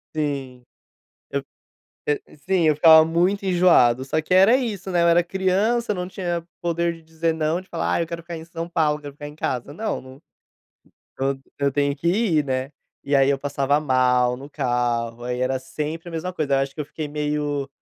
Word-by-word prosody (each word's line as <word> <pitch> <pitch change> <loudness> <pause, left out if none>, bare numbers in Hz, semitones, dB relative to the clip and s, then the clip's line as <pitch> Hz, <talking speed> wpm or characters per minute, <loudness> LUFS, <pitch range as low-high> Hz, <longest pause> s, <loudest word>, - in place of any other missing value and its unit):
Sim. 135 -5 -3 0.7
Eu - - -2 0.6
e 145 - 0
e - - -18
sim, 175 +2 +1
eu 155 - +4
ficava 160 +1 +8
muito 180 +5 +1
enjoado, 175 -10 +4
só 155 +4 -1
que 160 - -2
era 195 +7 +6
isso, 205 -7 -4
né. 175 -1 +2
Eu - - +4
era 170 +1 +5
criança, 195 +6 +1
não 180 -2 -4
tinha 175 -3 -3 0.2
poder 170 0 0
de 165 - -14
dizer 160 +1 -2
não, 160 +2 -1
de 185 - -21
falar 165 - -1
ah - - +1
eu 165 - -2
quero 170 0 -6
ficar 170 0 -7
em 160 - -8
São 165 0 -6
Paulo, 155 -3 +1
quero 145 -1 -8
ficar 145 +1 -8
em 150 - -11
casa. 130 -2 -3
Não. 140 - -5 1.0
Eu 135 0 0 0.2
eu 140 0 +2
tenho 140 0 +1
que 155 +4 -3
ir, 175 -5 +2
né. 130 0 -2 0.3
E 140 +1 +1
aí 135 0 +4
eu 140 -1 +1
passava 140 0 +1
mal 125 -3 +2
no 135 +2 -10
carro, 120 -3 -1
aí 125 0 -3
era 130 +1 0
sempre 155 +5 -5
a - - -10
mesma 165 +2 -3
coisa, 155 -6 -1
eu 135 - +4
acho 135 0 -2
que 155 - -3
eu - - -6
fiquei 155 +1 -6
meio 145 -1 -2
155 Hz, 210 wpm, -23 LUFS, 135-170 Hz, 1.0 s, ficava